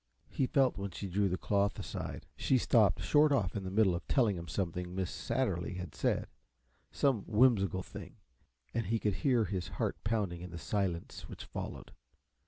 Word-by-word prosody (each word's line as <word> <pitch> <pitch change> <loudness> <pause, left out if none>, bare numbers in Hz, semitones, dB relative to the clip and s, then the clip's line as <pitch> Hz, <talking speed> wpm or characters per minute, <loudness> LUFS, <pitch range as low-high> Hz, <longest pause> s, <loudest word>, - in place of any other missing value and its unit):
He 130 - +1
felt 135 -5 +2
when 100 0 -3
she 95 +2 -6
drew 100 +2 +1
the 90 - -1
cloth 100 +1 +1
aside; - - -5
she 130 - +2
stopped 110 -5 +3
short 150 0 +5
off 115 -10 +1
in 100 - -2
the 95 - -4
middle 100 -1 +3
of 85 - -5
telling 115 -7 +3
him 85 -1 -6
something 90 +1 -3
Miss 95 -2 -1
Satterly 110 -7 -1
had 90 -4 -6
said - - 0 0.6
some 130 -8 +1
whimsical 105 -6 +3
thing - - -10 0.6
and 115 0 -1
he 115 - +1
could 105 -2 0
hear 125 -6 +3
his 95 -3 -3
heart - - -2
pounding 105 -6 -1
in 90 - -7
the 85 - -7
silence 85 +3 -3
which - - -8
followed. - - -6
100 Hz, 185 wpm, -33 LUFS, 90-115 Hz, 0.6 s, short